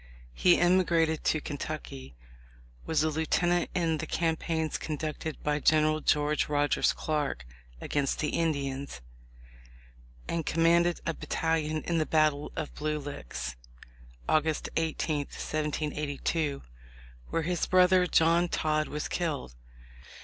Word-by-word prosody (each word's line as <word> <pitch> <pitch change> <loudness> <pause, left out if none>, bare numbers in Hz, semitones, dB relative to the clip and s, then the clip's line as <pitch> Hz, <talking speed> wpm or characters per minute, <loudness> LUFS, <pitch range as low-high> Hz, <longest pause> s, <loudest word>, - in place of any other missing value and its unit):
He 175 - +4
emigrated 170 -3 +3
to 155 - +2
Kentucky, 65 - -6 0.7
was 155 -2 +2
a 155 - +1
lieutenant 175 +3 +1
in 165 -3 +1
the 160 - -4
campaigns 160 -1 -1
conducted 155 0 -4
by 150 0 +1
General 155 +1 +3
George 150 0 +1
Rogers 145 0 +2
Clark 145 - -2 0.3
against 140 - -1
the 150 - -1
Indians, 140 - -2 1.3
and 165 -1 -1
com 165 +2 0
manded 170 +1 +3
a 165 - 0
battalion 155 -1 -1
in 170 -1 0
the 155 - 0
battle 155 -2 +2
of 155 - -4
Blue 150 0 -2
Licks, 65 - -6 0.7
August 155 0 +1
18, 160 -1 0
1782, 150 0 -2 0.7
where 165 - -1
his 175 +1 -1
brother, 185 0 +5
John 170 +1 +4
Todd, 155 -1 0
was 150 0 -4
killed. 150 - -3
155 Hz, 120 wpm, -29 LUFS, 150-165 Hz, 1.3 s, brother